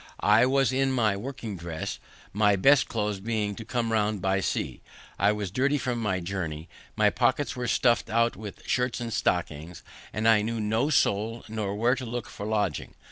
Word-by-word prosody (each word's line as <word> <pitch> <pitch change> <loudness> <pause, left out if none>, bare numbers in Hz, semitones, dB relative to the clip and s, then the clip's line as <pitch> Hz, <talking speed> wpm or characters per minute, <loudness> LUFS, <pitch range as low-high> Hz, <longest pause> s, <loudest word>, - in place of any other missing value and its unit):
I 110 +4 +5
was 135 0 +2
in 135 0 +2
my 110 -6 +2
working 115 -1 -6
dress, 85 -2 -5 0.3
my 105 0 +4
best 135 +8 +5
clothes 105 -3 -2
being 105 0 -1
to 110 - -8
come 115 0 -2
round 105 -1 +1
by 95 +1 +1
sea. - - -2 0.4
I 100 +2 +4
was 105 -3 -3
dirty 140 +7 +1
from 125 -3 -2
my 100 -5 0
journey; 85 -4 -4 0.3
my 105 -1 +3
pockets 130 +3 +1
were 125 -1 -3
stuff'd 120 0 +2
out 115 +1 +2
with 105 0 -9
shirts 125 -1 0
and 115 -2 -4
stockings, 85 -1 -2 0.3
and 110 +2 -1
I 110 -2 +6
knew 115 +2 -2
no 110 +6 +1
soul 115 -5 +1
nor 105 -2 -3
where 120 +4 +2
to 130 0 -4
look 120 -1 -4
for 100 - -7
lodging. 105 -8 -1
110 Hz, 190 wpm, -27 LUFS, 100-120 Hz, 0.4 s, I